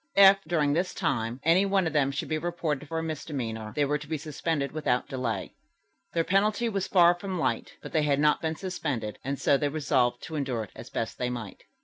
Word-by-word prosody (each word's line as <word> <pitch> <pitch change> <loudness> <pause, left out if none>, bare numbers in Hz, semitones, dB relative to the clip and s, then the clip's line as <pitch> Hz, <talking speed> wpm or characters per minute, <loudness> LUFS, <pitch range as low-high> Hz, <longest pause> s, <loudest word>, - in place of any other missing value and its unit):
If, 195 0 +8
during 150 -4 +2
this 180 +4 0
time, 120 - -1
any 170 +4 +5
one 195 -2 +2
of 160 - -1
them 145 -3 +3
should 140 - -3
be 155 0 -1
reported 155 -4 -2
for 165 +1 -3
a 160 - -1
misdemeanor, 130 -9 -4
they 145 - +2
were 150 +1 0
to 150 - -10
be 160 0 -2
suspended 150 -1 -2
without 135 -5 0
delay. 125 -4 -3 0.6
Their 165 - +2
penalty 205 +5 +2
was 195 -3 -2
far 175 -2 +6
from 185 +1 -5
light, 160 - -1
but - - -7
they 155 - +2
had 145 -2 +2
not 150 0 +3
been 160 0 -1
suspended, 145 - -3
and 135 +1 -3
so 140 - +4
they 145 +1 0
resolved 130 -5 +1
to 160 - -6
endure 130 -6 -1
it 100 - -11
as - - -9
best - - -4
they 125 - 0
might. 120 -5 -7
150 Hz, 225 wpm, -28 LUFS, 135-170 Hz, 0.6 s, If